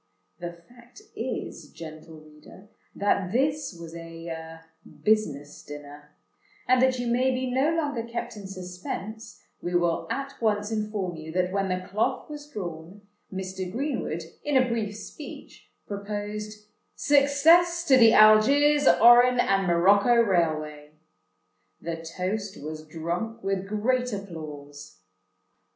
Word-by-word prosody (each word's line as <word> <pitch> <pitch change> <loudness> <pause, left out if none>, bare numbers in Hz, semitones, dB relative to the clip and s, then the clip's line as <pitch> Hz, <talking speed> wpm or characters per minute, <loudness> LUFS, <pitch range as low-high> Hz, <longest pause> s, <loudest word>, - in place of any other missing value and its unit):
The 175 -1 -5
fact 240 - -18
is, - - -5
gentle 155 -1 -10
reader, 155 +6 -16 0.3
that 200 -2 0
this 280 +4 0
was 165 0 -9
a 165 -1 -8 0.4
"business 150 -10 0
dinner;" 145 0 -11 0.5
and 255 0 +4
that 260 0 +3
you 245 - -3
may 245 +2 +2
be 255 0 -1
no 265 +4 +2
longer 290 -7 -1
kept 235 0 -5
in 200 -2 -8
suspense, 190 +4 -7 0.2
we 175 0 -3
will 175 -1 +1
at 275 -1 -5
once 210 -1 0
inform 210 -5 -3
you 160 0 -8
that 180 0 0
when 195 0 -1
the 185 0 -3
cloth 225 +9 -1
was 295 0 -8
drawn, 175 - -7 0.3
Mr. 190 -1 -5
Greenwood, 245 - -3 0.2
in 290 -2 +2
a 255 -1 +4
brief 220 -3 -2
speech, 290 +7 -11 0.2
proposed 210 +1 -6 0.3
"Success 320 +5 +4
to 275 - +6
the 230 -3 +7
Algiers, 275 +7 +6
Oran, 240 +2 +7
and 195 -4 +2
Morocco 200 +7 +4
Railway." 155 -8 0 0.9
The 165 0 -4
toast 190 +5 -4
was 155 +1 -7
drunk 175 +9 -4
with 195 0 -2
great 250 +4 0
applause. 150 - -8
205 Hz, 130 wpm, -26 LUFS, 170-245 Hz, 0.9 s, the